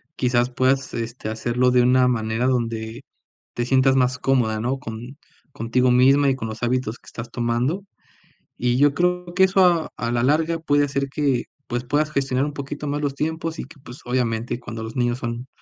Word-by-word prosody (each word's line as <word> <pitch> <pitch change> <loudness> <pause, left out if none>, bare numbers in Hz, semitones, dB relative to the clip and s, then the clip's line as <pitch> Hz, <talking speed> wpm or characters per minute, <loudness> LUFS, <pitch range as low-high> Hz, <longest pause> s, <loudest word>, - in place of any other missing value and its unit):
quizás, 125 -1 +1
puedas, 130 +1 0
este, 115 -1 -4
hacerlo 120 +3 +1
de 125 -1 +4
una 125 +1 +4
manera 115 0 0
donde 115 -3 -2 0.5
te 120 - -2
sientas 130 +1 +4
más 125 -1 +2
cómoda, 120 -5 +1
¿no?, 125 +4 -1
con 120 +3 -8 0.3
contigo 125 +1 +1
misma 135 +3 +5
y 135 - +1
con 115 -4 -5
los 110 +2 -7
hábitos 125 -1 0
que - - -28
estás 120 0 -8
tomando, 120 - -1 0.7
y 120 0 +1
yo 145 +1 +4
creo 180 +2 0
que 190 +1 +4
eso 190 0 +4
a 170 -3 +2
a 115 - -2
la 120 0 +1
larga 160 +5 +2
puede 145 -2 +2
hacer 140 0 -2
que, 135 -3 0 0.2
pues, 120 0 -3
puedas 150 +4 0
gestionar 135 -2 0
un 145 - -4
poquito 145 +1 -6
más 145 +1 -2
los 140 -2 -2
tiempos 160 +2 -3
y - - -4
que, 145 - -15
pues, 125 +3 -11
obviamente, 120 -1 -1
cuando 115 -2 -7
los 110 0 -7
niños 120 -1 +1
son 120 +1 -5
125 Hz, 195 wpm, -22 LUFS, 120-140 Hz, 0.7 s, misma